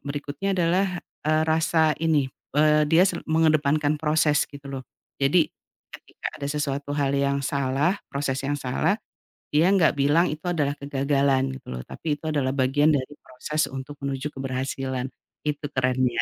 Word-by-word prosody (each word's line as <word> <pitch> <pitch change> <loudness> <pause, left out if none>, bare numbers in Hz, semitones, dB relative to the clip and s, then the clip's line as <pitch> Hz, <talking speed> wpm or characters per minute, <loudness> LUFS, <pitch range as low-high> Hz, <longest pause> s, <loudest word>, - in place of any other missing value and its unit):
berikutnya 145 +7 -3
adalah, 180 +3 +2 0.4
eee, 155 0 +3
rasa 160 0 +3
ini, 150 -5 +1 0.2
eee, 150 0 +4
dia 165 +4 +6
se 185 -3 -1
mengedepankan 155 -2 +2
proses, 150 -1 +2
gitu 140 -1 -10
loh. 130 -1 -5 0.4
Jadi, 150 +5 +4 0.5
ketika - - -8
ada 140 - -2
sesuatu 145 0 -2
hal 140 -1 +1
yang 140 0 +1
salah, 140 +8 0
proses 140 -1 -2
yang 145 +1 -1
salah, 135 +10 0 0.6
dia 160 +5 +5
nggak 185 -6 +4
bilang 145 +5 +3
itu 155 - -9
adalah 145 -4 0
kegagalan, 140 -1 +1
gitu - - -27
loh. 60 - -5
Tapi 150 -3 -3
itu 155 - -14
adalah 135 -3 +1
bagian 135 +4 +3
dari 145 -2 0
proses 150 +5 -2
untuk 135 +2 -8
menuju 140 +1 -3
keberhasilan, 130 -1 -3 0.4
itu 150 0 -2
kerennya. 130 -2 +2
145 Hz, 150 wpm, -25 LUFS, 135-155 Hz, 0.6 s, dia